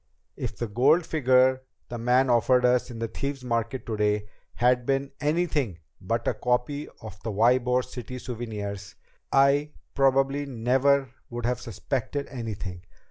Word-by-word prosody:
If - - -5
the 120 - -2
gold 140 +11 +3
figure 130 -4 +3 0.3
the 120 - -5
man 125 +3 +3
offered 125 +2 +4
us 125 +1 +2
in 120 - -8
the 115 0 -2
Thieves' 140 +3 -4
Market 115 +1 -2
today 105 -2 0 0.3
had 125 0 +3
been 135 +2 -1
anything 150 - 0 0.2
but - - -2
a - - +2
copy 125 +4 -1 0.2
of 105 -2 -10
the 115 - -3
Ybor 125 +4 +3
City 125 0 -7
souvenirs, 105 -6 -6 0.4
I 140 +2 +3 0.2
probably 135 +1 +2
never 135 +2 +2 0.2
would 120 0 -4
have 125 0 -1
suspected 130 +4 -3
anything. 105 -8 -5
125 Hz, 140 wpm, -26 LUFS, 115-135 Hz, 0.4 s, offered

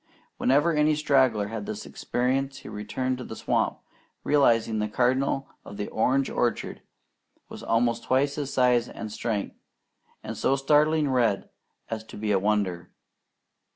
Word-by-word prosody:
Whenever 145 +6 +3
any 150 0 +3
straggler 130 -8 +2
had 115 - -5
this 215 0 -5
experience, 135 +2 -1
he - - -10
returned 125 +5 -3
to - - -5
the 110 - -8
swamp - - 0 0.5
realizing 115 -6 +3
that 105 - 0
the - - -14
Cardinal 130 +3 +1 0.2
of 100 - -10
the 105 - -4
orange 130 +4 +1
orchard 120 - -2 0.7
was - - -9
almost 115 0 0
twice 140 +2 +2
his 145 -2 -4
size 125 -2 +3
and 110 - -7
strength, 110 -1 -3 0.7
and 110 - -5
so 120 +5 +1
startlingly 150 +2 +3
red 120 -7 +1 0.4
as 110 -1 -3
to - - -11
be 105 0 -1
a 100 - +3
wonder. 100 -4 -1
125 Hz, 155 wpm, -26 LUFS, 110-135 Hz, 0.7 s, Whenever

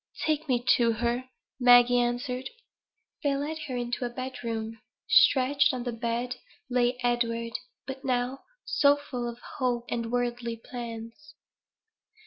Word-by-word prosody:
"Take 310 0 0
me 245 -2 +1
to 235 -1 +3
her," 240 +3 -1 0.3
Maggie 245 0 +7
answered. 250 +2 -1 0.7
They 285 -2 +1
led 300 +3 -3
her 255 -2 -3
into 245 +1 -2
a 245 - -1
bed 255 +1 -6
room. 225 -1 -4 0.3
Stretched 280 +4 +5
on 245 - -4
the 245 - -2
bed 235 +2 -2 0.3
lay 245 0 +2
Edward, 230 -1 0 0.3
but 265 0 -7
now 255 0 0 0.3
so 285 0 +4
full 250 -4 -4
of 235 - -8 0.2
hope 245 -2 0
and 230 -1 -2
worldly 240 -1 -1
plans. 235 +5 -8
245 Hz, 135 wpm, -28 LUFS, 235-260 Hz, 0.7 s, Maggie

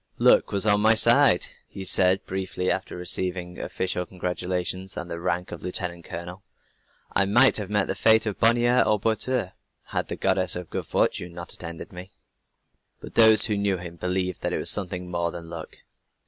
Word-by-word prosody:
"Luck - - +3
was 100 0 +1
on 105 -1 +3
my 110 +1 +4
side," 115 -3 +5 0.2
he 95 - -8
said 95 +1 +2
briefly 95 -1 -3
after 95 - -3
receiving 90 0 -1
official 90 -1 -3
congratulations, 90 +1 -4
and 85 - -6
the 85 - -5
rank 90 0 -3
of - - -8
lieutenant 90 -3 -3
colonel. 90 +3 -8 0.7
"I 100 - +4
might 120 +7 +5
have 105 -3 -5
met 105 -2 +2
the - - -2
fate 110 0 +3
of 105 -3 -4
Bonnier 120 +2 +3
and 105 -1 +1
Boiteux, 115 -1 -1 0.4
had - - -2
the - - -5
Goddess 95 -1 +1
of 90 -2 -7
Good - - -5
Fortune 85 -1 -1
not 85 0 -5
attended 85 0 -7
me." 90 +1 -10 0.9
But - - -11
those 110 -2 +7
who 105 - -1
knew 100 -1 0
him 85 -1 -9
believed 90 +1 -3
that - - -2
it - - -1
was - - +1
something 90 -2 -2
more 85 -1 -1
than 85 -1 -9
luck. - - -9
95 Hz, 185 wpm, -24 LUFS, 90-105 Hz, 0.9 s, those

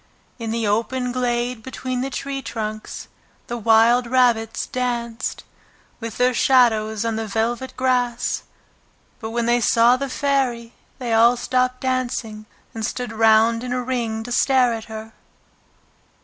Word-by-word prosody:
In 230 -1 -4
the 230 0 -1
open 235 +4 0
glade 245 -1 -1
between 255 +1 -4
the 270 - -2
tree 275 0 -4
trunks 215 -3 -6 0.4
the 240 - -5
wild 230 +2 +4
rabbits 235 -3 +2
danced 240 -2 -3 0.6
with 230 -2 -6
their 250 0 +3
shadows 225 -4 +3
on 225 -1 -1
the 220 0 -3
velvet 230 +5 -2
grass, 250 -2 0 0.8
but 220 -2 -5
when 235 +1 -1
they 240 +1 +2
saw 235 +2 +4
the 275 +1 -4
Fairy 255 -4 -1 0.2
they 245 -3 -3
all 235 +2 +5
stopped 255 +1 0
dancing 245 -4 -2 0.3
and 225 - -5
stood 245 +1 -3
round 225 +1 +4
in 250 -1 -3
a 250 0 -1
ring 235 -3 -2
to 245 - -8
stare 250 -1 +3
at 225 -1 -6
her. 220 0 -9
240 Hz, 145 wpm, -22 LUFS, 225-255 Hz, 0.8 s, all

